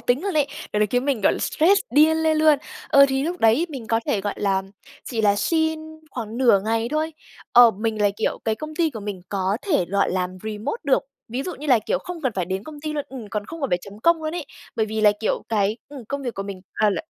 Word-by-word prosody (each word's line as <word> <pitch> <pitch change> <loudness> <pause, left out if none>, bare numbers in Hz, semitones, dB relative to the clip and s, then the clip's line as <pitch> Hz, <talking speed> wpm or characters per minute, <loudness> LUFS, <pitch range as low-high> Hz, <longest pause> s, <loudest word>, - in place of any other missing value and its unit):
tính 250 +5 +1
luôn 395 -3 -2
ấy, 295 -2 +3 0.3
gọi 210 - +1
là, 210 - +4
khiến 245 +5 0
mình, 275 -6 0
gọi - - +4
là, - - -3
stress 390 +6 +3
điên 310 +2 +5
lên 315 -1 +3
luôn. 310 -2 +5 0.3
Ờ, 280 0 +7
thì 265 0 0
lúc 345 +4 -2
đấy 230 +10 +4
mình 265 -7 -7
có 225 +1 +1
thể, 200 - +1
gọi 205 0 -3
là, 195 -2 +1 0.4
chỉ 230 -3 -2
là 205 -1 +3
xin 320 +7 +1 0.3
khoảng 230 -2 -5
nửa 240 -7 +5
ngày 225 +1 0
thôi, 310 +2 -1 0.4
ờ, 240 -1 +9
mình 220 +1 -3
là, 205 - +4
kiểu, 220 - -1
cái 220 -1 +1
công 310 +5 -7
ty 325 -1 +1
của 225 - -7
mình 200 -3 -5
có 195 +1 0
thể 300 - +1
gọi 200 +3 +1
làm 185 -1 -1
remote 215 - -4
được, 275 - +3 0.3
ví 250 +4 -3
dụ 360 - -5
như 300 - -8
là, 255 -5 +5
kiểu, 215 - -1
không 355 -2 -7
cần 260 -5 0
phải 185 - -1
đến 190 +3 -3
công 300 -2 -10
ty 305 0 -3
luôn, 290 -2 -2
ừm, 250 -5 -8
còn 205 +1 -3
không 330 +6 -8
cần 275 - -2
phải 180 - +2
chấm 200 +1 -11
công 335 +4 +3
luôn 310 +2 -3
ấy. 345 - -3 0.3
Bởi 220 - +1
vì 220 0 -3
là, 210 -1 +6
kiểu, 220 - 0
cái, 210 0 +1
ừm, 275 -5 -9
công 280 0 -3
việc 245 -3 -4
của 195 - -3
mình, 195 -2 -7
ờ, 210 -1 +3
là 185 - -2
235 Hz, 270 wpm, -23 LUFS, 210-305 Hz, 0.4 s, ờ